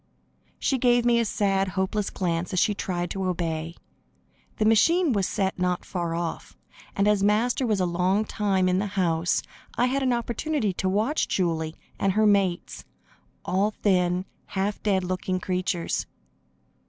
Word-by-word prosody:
She 265 - 0
gave 240 -1 +3
me 240 -1 +4
a 230 - +1
sad, 195 -2 +1
hopeless 190 +2 -1
glance 175 -1 -2
as 185 - +2
she 210 - +3
tried 175 -3 -3
to 195 -1 -2
obey. 165 -2 -2 0.8
The 215 - +1
machine 310 - +4
was 195 -3 +1
set 195 -3 -1
not 180 -1 0
far 170 -2 -3
off, 170 -1 -5 0.4
and 200 +1 +2
as 210 -1 +3
Master 230 +5 +2
was 210 -3 +1
a 185 - +2
long 180 +4 +1
time 195 -4 0
in 180 0 +2
the 205 - -1
house, 170 -2 +1 0.3
I 245 - +3
had 270 +2 0
an 260 -1 +2
opportunity 235 0 -1
to 185 +1 -1
watch 220 +10 +1
Julie 165 -3 -1 0.2
and 195 -1 +2
her 215 +2 +3
mates 195 -4 +1 0.6
all 195 +3 +1
thin, 180 -2 +2 0.2
half 200 +1 -2
dead 195 -3 +1
looking 185 0 -2
creatures. 180 -1 -2
195 Hz, 160 wpm, -25 LUFS, 180-215 Hz, 0.8 s, me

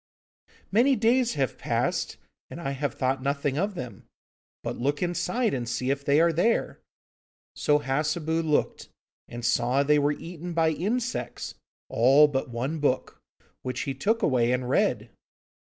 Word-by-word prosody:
'Many 250 +7 +4
days 240 +2 +2
have 135 -4 -1
passed, - - -1 0.3
and - - -8
I 135 -5 -3
have 140 +1 -3
thought 130 0 0
nothing 140 +1 -1
of 200 +2 -1
them. 125 -7 -8 0.6
But - - -4
look 145 +6 0
inside 220 +7 0
and 120 -3 -3
see 125 +2 -1
if 140 0 -2
they 140 +2 +3
are 170 0 +4
there.' 220 +9 +1 0.8
So 150 - +3
Hassebu 155 +3 -1
looked, 155 -2 -1 0.4
and 120 0 -7
saw 125 +4 +2
they 150 +1 +4
were 145 +1 +2
eaten 170 +2 -7
by 165 -1 +3
insects, 225 +10 -3 0.3
all 135 +6 +5
but 135 -3 -2
one 130 +7 -3
book, 130 -3 -1 0.4
which 130 0 -3
he 135 - -2
took 215 - 0
away 125 -3 +3
and 125 0 -1
read. - - +1
145 Hz, 155 wpm, -26 LUFS, 130-170 Hz, 0.8 s, all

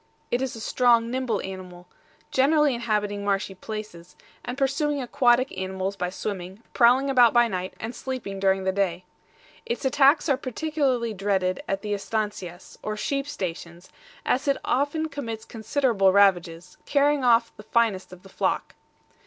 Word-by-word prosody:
It 240 - +1
is 265 -3 -3
a - - -8
strong, 235 0 +2
nimble 255 -5 -1
animal, 180 -2 -9 0.4
generally 290 +1 +3
inhabiting 210 -3 -1
marshy 195 -1 -1
places, 190 -3 -8 0.3
and 245 +2 -5
pursuing 285 +2 0
aquatic 255 -1 +2
animals 190 +1 -3
by 180 -2 -2
swimming, 190 +1 -6
prowling 250 +3 +5
about 250 -4 +5
by 240 -1 +5
night 185 -3 -4
and 225 +2 -5
sleeping 240 -6 -5
during 190 0 +2
the 190 - +1
day. 185 -2 -1 0.6
Its 470 - -4
attacks 280 +4 +4
are 275 -4 +2
particularly 260 -3 -1
dreaded 190 -2 0
at 195 0 -2
the 210 -1 -2
ESTANCIAS, 200 -3 -4
or 215 0 -4
sheep 275 +6 -2
stations, 170 - -6 0.3
as 265 +3 0
it 275 - +2
often 290 +4 0
commits 230 -8 -6
considerable 225 -3 +1
ravages, 180 -3 +2
carrying 285 -1 +2
off 235 -1 +3
the - - -11
finest 210 -4 0
of 185 0 -13
the 195 - -14
flock. - - -1
220 Hz, 155 wpm, -25 LUFS, 190-260 Hz, 0.6 s, prowling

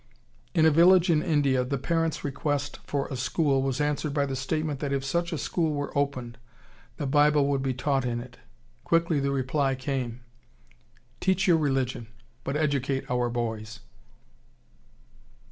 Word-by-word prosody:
In 160 -2 +5
a 160 - +6
village 175 +3 +6
in 155 -2 +3
India 140 -5 +2
the 140 +2 -2
parents' 165 +3 -1
request 145 0 -2
for 140 -1 -1
a 135 - -4
school 135 +2 +1
was 135 0 -1
answered 150 0 -1
by 140 -1 +2
the 135 -1 -3
statement 150 +2 -2
that 140 -1 -3
if 135 -1 -1
such 170 +4 -1
a 165 - -2
school 160 0 -1
were 145 0 -4
opened, 130 -5 -2 0.6
the 145 - -3
Bible 145 +1 +4
would 140 -1 0
be 130 -1 -1
taught 135 +1 0
in 120 -1 -2
it. 120 0 -10 0.5
Quickly 165 -2 +2
the 140 0 0
reply 135 0 0
came, 130 -3 -3 1.0
"Teach 190 +1 +1
your 170 -2 +5
religion, 135 -6 -1 0.4
but 140 +3 -2
educate 140 -3 0
our 125 -1 +1
boys." 110 -2 -4
140 Hz, 160 wpm, -27 LUFS, 130-150 Hz, 1.0 s, a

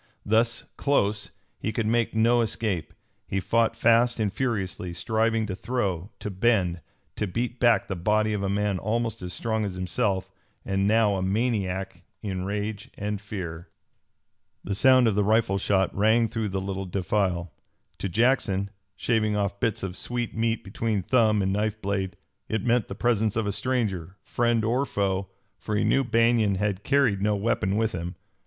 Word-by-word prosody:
Thus 115 +2 +2
close, 105 -7 +1 0.3
he 110 - -2
could 110 0 -1
make 115 0 +1
no 120 +2 +4
escape. 105 -7 -2 0.4
He 95 - -1
fought 115 +4 +1
fast 115 +1 +3
and 105 -3 0
furiously, 95 -8 -2
striving 110 +4 +1
to 100 -3 -4
throw, 100 -6 -2
to 105 - -5
bend, 95 -4 +1 0.4
to 105 - -1
beat 120 +6 -3
back 120 -2 +4
the 95 - -3
body 105 +4 +1
of 105 - -1
a 100 - -1
man 100 -1 0
almost 115 +1 -1
as 90 -1 -5
strong 110 +3 -1
as 100 -3 -3
himself, 95 +1 -1 0.3
and 95 0 +1
now 105 -2 +3
a - - -2
maniac 95 -2 -1 0.2
in 95 -3 -3
rage 105 +1 -3
and 105 -1 -3
fear. 90 -5 -6 0.9
The 100 - -2
sound 130 +3 +5
of 110 - +2
the 105 +1 +2
rifle 105 -2 +2
shot 95 -1 +1
rang 110 +3 +4
through 110 -2 -2
the 95 0 -2
little 95 0 -4
defile. 90 -2 -1 0.5
To 100 - -2
Jackson, 100 -2 +1 0.2
shaving 110 0 +1
off 100 -1 -1
bits 115 -3 -1
of 95 -2 -4
sweet 120 +2 -3
meat 115 0 0
between 105 0 -2
thumb 110 -2 +3
and 95 0 0
knife 105 +1 -1
blade, 95 -2 -2 0.3
it 110 -1 -1
meant 120 -3 +2
the 95 - -6
presence 110 -3 +1
of 110 -1 0
a 100 - 0
stranger, 100 -7 -1
friend 120 -2 +1
or 125 +5 +2
foe, 100 -6 -1 0.3
for 105 - -3
he 105 - +2
knew 135 - +3
Banion 115 -3 +3
had 100 0 -1
carried 130 -9 +2
no 105 +1 +2
weapon 100 -2 0
with 110 0 +1
him. 90 -1 -5
105 Hz, 175 wpm, -26 LUFS, 95-115 Hz, 0.9 s, sound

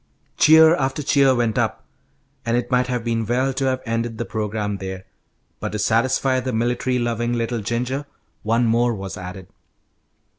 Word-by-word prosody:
Cheer 160 +1 +7
after 135 +2 -1
cheer 140 -2 +4
went 115 -3 0
up, - - -2 0.6
and 115 +1 0
it 120 +2 -3
might 125 0 +2
have 125 -2 -2
been 115 -1 -1
well 130 +4 0
to 135 - -1
have 130 -1 -1
ended 115 0 -2
the 120 - -3
programme 105 -2 -3
there, 95 -1 -7 0.5
but - - -4
to - - -1
satisfy 130 +5 +1
the 130 0 -3
military 120 +2 0
loving 120 0 -1
little 115 0 -1
Ginger, 125 +6 -2 0.3
one 115 +2 +1
more 120 +1 +2
was 95 -1 -6
added. 90 +1 -8
120 Hz, 170 wpm, -22 LUFS, 110-130 Hz, 0.6 s, Cheer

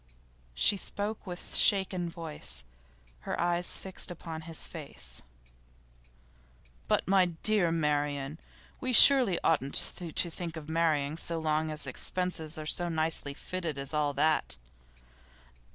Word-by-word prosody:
She 200 - +4
spoke 205 +2 -5
with 175 -1 -6
shaken 190 -3 +3
voice, 165 - -5 0.6
her - - -5
eyes 175 0 0
fixed 190 0 -3
upon 165 -2 -8
his 165 - 0
face. 65 - -5 1.7
'But, - - 0
my 190 -1 +4 0.2
dear 205 -6 +4
Marian, 145 -2 -2 0.4
we 255 -1 -3
surely 245 -7 +9
oughtn't 140 -3 0
to 175 -3 -2 0.2
think 165 -1 -6
of 155 -2 -9
marrying 160 -2 0
so 170 0 -2
long 155 0 -1
as 155 0 +1
expenses 180 -3 -1
are 155 - -7
so 175 +3 -1
nicely 160 -3 +1
fitted 170 -4 -5
as 140 +2 -4
all 150 -1 0
that? 155 - 0
165 Hz, 125 wpm, -29 LUFS, 150-180 Hz, 1.7 s, surely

